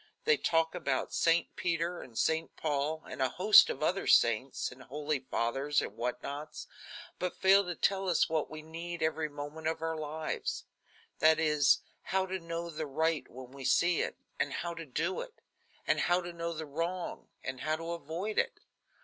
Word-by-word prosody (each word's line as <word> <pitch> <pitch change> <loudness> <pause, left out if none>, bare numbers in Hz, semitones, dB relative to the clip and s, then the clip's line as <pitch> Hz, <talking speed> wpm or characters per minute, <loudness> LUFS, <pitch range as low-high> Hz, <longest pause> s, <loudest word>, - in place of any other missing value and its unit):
They 460 - +5
talk 165 - +1
about 140 -7 -1
St. 165 +1 +2
Peter 170 0 -1
and 115 -3 -11
St. 160 0 0
Paul, 155 +1 -1
and - - -6
a 130 - +3
host 185 - +7
of 135 - -3
other 185 +5 0
saints 115 +3 +3
and 125 +1 -13
holy 145 +3 -2
fathers 135 +3 0
and - - -4
what 120 +1 -3
nots, 145 +2 -6 0.5
but 180 -1 -2
fail 195 +1 +6
to 175 -1 -3
tell 195 +1 +1
us 175 - +3
what 160 -2 -1
we 155 0 -8
need 165 +1 -5
every 160 0 0
moment 145 +2 -6
of 160 - -1
our 165 0 -2
lives; 155 0 -3 0.5
that 160 +1 +5
is, 150 -3 +4 0.2
how 190 0 0
to 190 0 -3
know 170 0 -4
the 155 -1 -4
right 160 +2 0
when 130 0 -10
we 135 0 -9
see 175 +5 +3
it, - - -3 0.2
and 145 - 0
how 170 0 -3
to 165 -1 -8
do 165 +8 -1
it; - - -9 0.5
and - - +2
how 175 +1 +3
to 175 -1 -6
know 170 0 -3
the 160 -1 -5
wrong 165 +5 -3 0.2
and 130 -1 -4
how 155 +2 +1
to 165 +1 -5
avoid 170 +6 -2
it. - - -1
160 Hz, 190 wpm, -32 LUFS, 145-170 Hz, 0.5 s, host